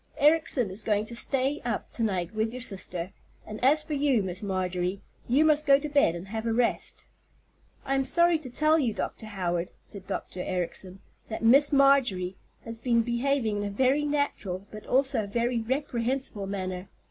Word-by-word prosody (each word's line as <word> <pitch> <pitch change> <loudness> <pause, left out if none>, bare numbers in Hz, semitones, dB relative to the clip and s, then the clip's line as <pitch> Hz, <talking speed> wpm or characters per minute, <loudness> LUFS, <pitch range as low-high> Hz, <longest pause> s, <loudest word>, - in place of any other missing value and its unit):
Ericson 295 -8 +3
is 195 +4 -3
going 210 -1 0
to 235 - -6
stay 270 +4 0
up 235 -3 -3
to - - -4
night 185 -4 -1
with 220 +1 0
your 250 - -6
sister; 185 -6 -2 0.3
and 215 +2 -8
as 300 +4 +5
for 305 0 -5
you, 275 -6 +2
Miss 185 0 -4
Marjorie, 185 -1 -2 0.3
you 275 +6 +4
must 305 -1 +3
go 275 -1 +7
to 295 +2 -4
bed 285 - +3
and 175 +3 -8
have 220 +2 -3
a 225 - +1
rest." 235 +1 -1 0.8
"I 270 - 0
am 270 0 +2
sorry 340 +3 +3
to 280 -4 -8
tell 305 +5 +3
you, 235 -7 0
Dr. 220 - -4
Howard," 180 -4 -2
said 195 -2 -10
Dr. 190 -1 -4
Ericson, 185 +1 -4 0.3
"that 220 - -5
Miss 275 +6 +5
Marjorie 270 -10 +3 0.3
has 230 -1 -5
been 235 -1 +2
behaving 240 -2 0
in 205 - -2
a 205 - -2
very 260 +8 +2
natural 285 -11 -2
but 215 -1 -10
also 260 -4 +2
a - - -9
very 235 +3 0
reprehensible 250 -4 -2
manner. 185 -1 -4
230 Hz, 185 wpm, -27 LUFS, 195-275 Hz, 0.8 s, go